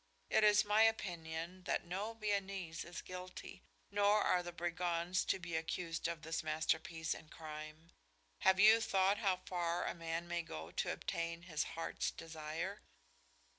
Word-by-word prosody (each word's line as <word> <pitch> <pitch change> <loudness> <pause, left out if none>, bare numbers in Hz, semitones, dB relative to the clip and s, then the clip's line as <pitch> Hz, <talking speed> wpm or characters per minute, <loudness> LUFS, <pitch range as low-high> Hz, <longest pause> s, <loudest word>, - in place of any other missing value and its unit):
It - - +5
is 210 0 +6
my 210 +1 +4
opinion 175 -4 0
that - - 0
no 195 +6 -3
Viennese 195 -6 -2
is 170 0 -7
guilty, 185 0 -8 0.3
nor 205 +1 +4
are 180 - +3
the 175 0 -6
brigands 175 +1 0
to - - +2
be 170 -3 -5
accused 165 +1 -2
of 170 -2 -4
this 160 +1 -1
masterpiece 160 +1 0
in 155 - -11
crime. 155 +1 -8 0.5
Have 190 0 +5
you 220 +2 +8
thought 195 -1 +3
how 190 -4 +1
far 175 -1 0
a - - -1
man 165 0 -3
may 175 0 -1
go 80 - -7
to - - 0
obtain 170 0 -3
his 155 -3 -1
heart's 165 - -1
desire?" 165 +4 -5
175 Hz, 155 wpm, -37 LUFS, 165-190 Hz, 0.5 s, you